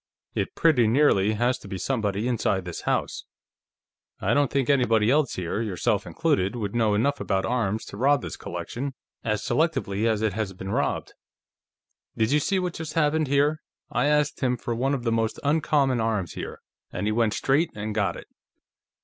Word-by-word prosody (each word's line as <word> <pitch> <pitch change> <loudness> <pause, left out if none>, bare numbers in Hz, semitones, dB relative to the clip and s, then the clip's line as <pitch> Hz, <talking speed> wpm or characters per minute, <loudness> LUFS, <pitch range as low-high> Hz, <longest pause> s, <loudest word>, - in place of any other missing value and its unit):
"It - - -2
pretty 140 -9 +4
nearly 110 -5 +3
has 120 +4 +1
to - - -12
be 95 -1 -5
somebody 105 -1 -1
inside 100 -6 0
this 90 - -6
house. - - -1 0.9
I - - +1
don't 145 -2 +3
think 135 -2 0
anybody 115 -5 +3
else 150 0 +2
here, 90 +4 -2
yourself 100 -6 -1
included, 95 +4 0
would 105 -4 -3
know 110 -3 +2
enough 140 +7 +1
about 95 0 0
arms 110 -3 -1
to - - -9
rob 135 +2 +3
this - - -5
collection 135 +2 -5 0.3
as 105 +1 -1
selectively 125 -6 0
as 110 -1 +1
it 110 -3 +1
has 105 -2 -3
been 95 +1 -6
robbed. - - -1 1.0
Did 110 +2 +2
you 150 - +4
see 195 +6 0
what 180 -2 -1
just 160 -1 -6
happened, 155 -1 +2
here? 145 +3 +2 0.3
I 125 +5 +1
asked 150 0 +2
him 125 -2 +1
for 120 - -3
one 135 +4 0
of 125 - -5
the 115 - 0
most 115 0 0
uncommon 145 -4 +2
arms 105 -7 -1
here, - - -7 0.3
and 90 - -3
he 105 - +1
went 115 -1 +1
straight 145 +5 +2
and 105 +1 -4
got 100 -4 0
it. - - -10
120 Hz, 185 wpm, -25 LUFS, 105-140 Hz, 1.0 s, pretty